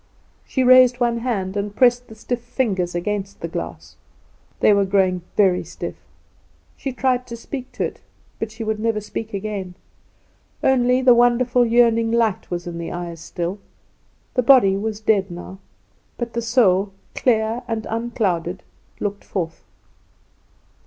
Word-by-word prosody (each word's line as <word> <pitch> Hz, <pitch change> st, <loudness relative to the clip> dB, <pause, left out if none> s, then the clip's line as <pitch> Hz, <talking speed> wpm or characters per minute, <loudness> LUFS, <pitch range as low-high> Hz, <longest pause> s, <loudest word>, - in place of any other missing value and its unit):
She 260 Hz, -, 0 dB
raised 255 Hz, -1 st, +6 dB
one 235 Hz, -1 st, +1 dB
hand 205 Hz, -6 st, -2 dB
and 205 Hz, 0 st, -3 dB
pressed 245 Hz, 0 st, +3 dB
the 220 Hz, -, -12 dB
stiff 240 Hz, +2 st, -4 dB
fingers 200 Hz, -8 st, -1 dB
against 200 Hz, +2 st, -3 dB
the 170 Hz, -, -3 dB
glass. 165 Hz, -, -7 dB, 0.6 s
They 210 Hz, -, +5 dB
were 200 Hz, 0 st, +3 dB
growing 190 Hz, -2 st, +2 dB, 0.2 s
very 190 Hz, -3 st, +4 dB
stiff. -, -, -6 dB, 0.8 s
She 270 Hz, -, -4 dB
tried 250 Hz, 0 st, 0 dB
to 235 Hz, -1 st, -7 dB
speak 255 Hz, +2 st, -7 dB
to -, -, -2 dB
it, -, -, -4 dB, 0.4 s
but 225 Hz, -, -2 dB
she 220 Hz, +1 st, -6 dB
would 220 Hz, -1 st, -2 dB
never 225 Hz, -1 st, 0 dB
speak 215 Hz, +1 st, -6 dB
again. 195 Hz, -3 st, -4 dB, 0.9 s
Only 255 Hz, 0 st, +3 dB
the 255 Hz, -1 st, +7 dB
wonderful 245 Hz, 0 st, +3 dB
yearning 230 Hz, -1 st, +3 dB
light 230 Hz, -4 st, +1 dB
was 175 Hz, -1 st, -4 dB
in 170 Hz, -1 st, -6 dB
the 170 Hz, -, -5 dB
eyes 175 Hz, -1 st, -5 dB
still. 175 Hz, +4 st, -4 dB, 0.7 s
The 250 Hz, -, +2 dB
body 240 Hz, -6 st, +6 dB
was 210 Hz, +1 st, -3 dB
dead 205 Hz, -3 st, +2 dB
now, 175 Hz, +2 st, -9 dB, 0.6 s
but 235 Hz, -1 st, -4 dB
the 235 Hz, -, -1 dB
soul, 205 Hz, -5 st, +2 dB, 0.2 s
clear 225 Hz, -1 st, +1 dB
and 225 Hz, -2 st, -3 dB
unclouded, 195 Hz, -7 st, -2 dB, 0.4 s
looked 205 Hz, -1 st, -3 dB
forth. 170 Hz, -4 st, -4 dB
220 Hz, 150 wpm, -21 LUFS, 190-240 Hz, 0.9 s, the